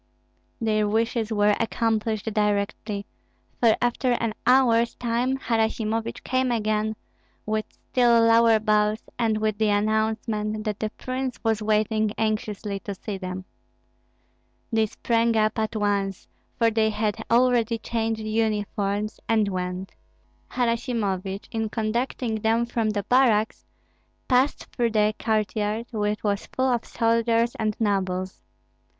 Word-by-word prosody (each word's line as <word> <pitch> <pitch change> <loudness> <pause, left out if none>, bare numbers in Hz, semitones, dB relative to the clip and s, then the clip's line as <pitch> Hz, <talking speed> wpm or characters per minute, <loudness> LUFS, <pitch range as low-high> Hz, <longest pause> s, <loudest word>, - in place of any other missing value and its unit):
Their 215 -2 +1
wishes 225 +1 0
were 205 -1 +3
accomplished 225 -2 0
directly; 205 0 -1 0.5
for 230 -2 +5
after 245 +1 +1
an 230 -2 -1
hour's 235 -2 +4
time 245 +2 0
Harasimovich 225 -2 -1
came 255 0 0
again, 215 -1 0 0.5
with 215 0 -1
still 240 -2 +2
lower 230 0 +5
bows, 210 0 +1 0.2
and 225 -2 +2
with 215 -1 -1
the 215 -1 +3
announcement 215 0 0
that 210 -2 -3
the 215 - -1
prince 255 0 -3
was 225 -2 +1
waiting 215 0 +1
anxiously 210 -2 -2
to 200 0 -6
see 195 +1 -6
them. 185 0 -5 1.3
They 220 -1 +3
sprang 230 +1 +1
up 215 +1 +1
at 220 +1 -2
once, 200 -2 -1 0.3
for 230 -1 +3
they 220 0 +2
had 215 0 -2
already 235 -1 +3
changed 225 -1 -2
uniforms, 215 -1 -1
and 220 -3 +3
went. 185 0 -4 0.6
Harasimovich, 220 -6 -1
in 225 -1 -2
conducting 225 0 -2
them 225 +2 +2
from 230 -2 -1
the 205 -1 -1
barracks, 225 -3 +2 0.6
passed 260 +2 +2
through 235 -3 +1
the 215 0 +3
courtyard, 215 0 -1
which 210 -2 -1
was 205 -1 -1
full 260 -1 +2
of 235 - -2
soldiers 230 0 +1
and 215 -1 -1
nobles. 185 -3 -1
220 Hz, 125 wpm, -25 LUFS, 210-230 Hz, 1.3 s, for